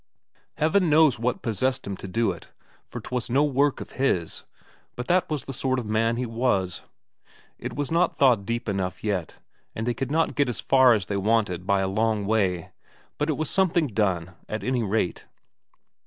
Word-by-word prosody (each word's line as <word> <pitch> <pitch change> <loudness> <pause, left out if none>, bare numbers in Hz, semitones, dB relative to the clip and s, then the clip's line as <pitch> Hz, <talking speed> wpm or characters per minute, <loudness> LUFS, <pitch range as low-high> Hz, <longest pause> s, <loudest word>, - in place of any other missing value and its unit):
Heaven 165 +3 +2
knows 150 -5 +5
what 120 +2 -1
possessed 130 +4 -1
him 100 - -4
to - - -8
do 115 +5 +1
it, - - -10 0.4
for - - -7
'twas 125 -2 -4
no 135 +5 +3
work 145 -1 +2
of - - -8
his, 90 -11 0 0.5
but 125 0 -5
that 180 0 +3
was 150 -3 -2
the 135 - -6
sort 130 +1 0
of 125 - -3
man 115 +2 +1
he 125 +1 -2
was. 115 -6 0 0.8
It - - -6
was 145 0 -3
not 170 +2 +2
thawed 125 -7 +4
deep 115 +3 -3
enough 95 -3 -2
yet, 100 -6 -2 0.4
and 110 - -3
they 120 - +1
could 135 +1 -4
not 160 +2 +1
get 145 -4 +1
as 120 - -4
far 130 -2 +5
as 105 -4 0
they 100 - -2
wanted 100 -4 0
by 100 -1 +3
a 95 - 0
long 105 +1 0
way, 95 -4 0 0.5
but 150 - 0
it 155 - 0
was 155 - -1
something 175 -4 +2
done, 95 -5 0 0.2
at 110 - -4
any 130 -1 0
rate. 105 -3 -1
115 Hz, 195 wpm, -25 LUFS, 100-135 Hz, 0.8 s, knows